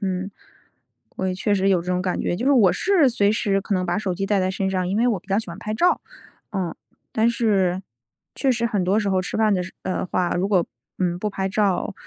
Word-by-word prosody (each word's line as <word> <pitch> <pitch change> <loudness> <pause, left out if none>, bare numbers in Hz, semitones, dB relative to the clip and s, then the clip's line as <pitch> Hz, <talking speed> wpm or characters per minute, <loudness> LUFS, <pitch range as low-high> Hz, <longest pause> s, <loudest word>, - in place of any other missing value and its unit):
嗯。 190 -1 -2 0.9
我 190 - -1
也 185 - -1
确 205 +3 0
实 195 0 +2
有 185 -3 +3
这 175 - -14
种 180 - 0
感 185 -1 -1
觉。 175 - -1
就 245 +6 -3
是 285 - +5
我 220 -9 +5
是 360 -8 +3
随 210 -4 +2
时 195 -2 +1
可 200 +1 -2
能 185 0 0
把 175 +2 0
手 190 -4 -2
机 195 +2 -2
带 205 0 +2
在 185 - +1
身 190 0 -1
上， 185 -2 -1
因 195 - -1
为 240 +2 +3
我 220 -5 +1
比 - - -31
较 195 - +1
喜 220 - -4
欢 170 - -7
拍 215 0 -4
照， 355 +8 +3 0.5
嗯。 185 -5 -2 0.4
但 225 +1 +3
是 195 -6 +1 0.5
确 270 - +2
实 235 -1 -1
很 205 -6 0
多 200 +4 +2
时 205 -2 -1
候 185 - +2
吃 185 - -4
饭 220 -1 +3
的 185 - +1
时 185 - -8
呃， 185 - -2
话， 180 -1 0
如 185 +2 +1
果， 185 -4 +3 0.3
嗯， 175 -2 0
不 210 - -1
拍 195 -1 -2
照， 200 0 0
195 Hz, 275 characters per minute, -23 LUFS, 185-215 Hz, 0.9 s, 是